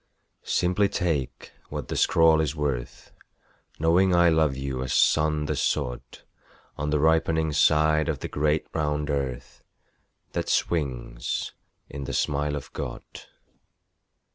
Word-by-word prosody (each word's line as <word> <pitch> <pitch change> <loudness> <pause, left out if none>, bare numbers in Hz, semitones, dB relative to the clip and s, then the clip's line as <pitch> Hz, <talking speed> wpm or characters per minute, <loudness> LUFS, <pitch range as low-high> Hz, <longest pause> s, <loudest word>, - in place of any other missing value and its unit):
Simply 95 +3 +1
take 80 -10 -2 0.2
what - - -5
the - - -4
scrawl 80 -1 +4
is 80 -1 -2
worth 70 -5 -4 0.7
Knowing 90 +3 +3
I 85 0 +5
love 80 -4 +2
you 65 -1 -4
as 65 - -2
sun 75 -1 +3
the - - -2
sod 60 0 -1 0.7
On 75 +1 -3
the 75 - +2
ripening 80 0 +2
side 75 +1 +3
of 75 - -1
the - - -5
great 75 +1 0
round 75 -1 -1
earth 65 -3 -4 0.7
That - - -3
swings 65 -7 -2 0.3
in 70 -1 -7
the 70 - -5
smile 75 +2 0
of 70 - -8
God. - - -5
75 Hz, 130 wpm, -25 LUFS, 70-80 Hz, 0.7 s, I